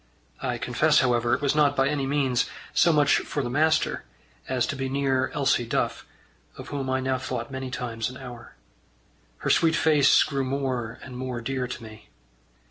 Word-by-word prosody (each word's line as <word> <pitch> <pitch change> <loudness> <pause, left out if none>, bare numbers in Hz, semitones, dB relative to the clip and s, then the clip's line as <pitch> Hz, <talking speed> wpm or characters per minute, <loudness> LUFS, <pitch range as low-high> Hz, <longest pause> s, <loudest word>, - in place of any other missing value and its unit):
I - - -2
confess, - - +3
however, 120 -2 +2
it - - -6
was 140 - +2
not 145 -2 +3
by 135 0 +2
any 140 -2 -1
means 135 -3 +1 0.2
so 170 - +4
much 145 -2 +4
for 145 - -3
the 120 - -3
master 155 +3 +1 0.5
as 130 -2 +1
to - - -3
be 135 -1 -3
near 135 -1 +1
Elsie 140 -4 +1
Duff, - - -2 0.5
of - - -9
whom 135 -2 -3
I 130 0 +1
now 130 0 -1
thought 135 - -4
many 130 -1 -5
times 115 -3 -3
an 130 - -10
hour. 125 -3 -10 0.8
Her - - -1
sweet 165 -1 +3
face 150 -3 +5
grew 140 -2 -2
more 130 -4 -2
and 130 - -9
more 125 -1 -4
dear 130 +1 -3
to 125 -1 -7
me. 110 -1 -13
130 Hz, 185 wpm, -26 LUFS, 125-140 Hz, 0.8 s, face